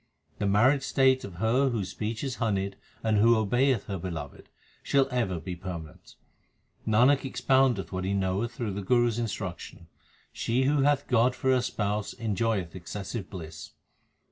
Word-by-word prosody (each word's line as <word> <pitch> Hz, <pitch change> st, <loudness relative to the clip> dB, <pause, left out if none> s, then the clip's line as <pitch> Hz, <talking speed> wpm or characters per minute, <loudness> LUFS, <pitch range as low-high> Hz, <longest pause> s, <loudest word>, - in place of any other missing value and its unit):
The 100 Hz, -, 0 dB
married 125 Hz, +8 st, +4 dB
state 130 Hz, -1 st, +3 dB
of 95 Hz, -3 st, -8 dB
her 115 Hz, +8 st, +2 dB
whose 105 Hz, -6 st, -2 dB
speech 110 Hz, +3 st, -4 dB
is 130 Hz, -2 st, -3 dB
honeyed 100 Hz, -4 st, -1 dB, 0.3 s
and 110 Hz, -2 st, +2 dB
who 115 Hz, +2 st, +5 dB
obeyeth 120 Hz, +2 st, +2 dB
her 100 Hz, -3 st, -4 dB
Beloved, 80 Hz, -5 st, -7 dB, 0.3 s
shall 135 Hz, -1 st, +2 dB
ever 110 Hz, -9 st, -1 dB
be 90 Hz, +3 st, -6 dB
permanent. 85 Hz, -3 st, -9 dB, 0.7 s
Nanak 125 Hz, +6 st, +5 dB
expoundeth 130 Hz, -5 st, +1 dB
what 95 Hz, -1 st, -3 dB
he 100 Hz, +1 st, 0 dB
knoweth 95 Hz, +4 st, -1 dB
through 115 Hz, -4 st, -4 dB
the 100 Hz, -, -4 dB
Guru 120 Hz, +4 st, +3 dB
s 115 Hz, 0 st, -3 dB
instruction 95 Hz, -6 st, -5 dB, 0.4 s
she 125 Hz, +3 st, 0 dB
who 140 Hz, +1 st, +2 dB
hath 145 Hz, 0 st, +2 dB
God 125 Hz, +1 st, +3 dB
for 130 Hz, -, +1 dB
her 130 Hz, -1 st, +3 dB
Spouse 105 Hz, -3 st, -2 dB
enjoyeth 105 Hz, -5 st, -1 dB
excessive 100 Hz, +4 st, -6 dB
bliss. 80 Hz, -5 st, -9 dB
110 Hz, 160 wpm, -28 LUFS, 95-125 Hz, 0.7 s, who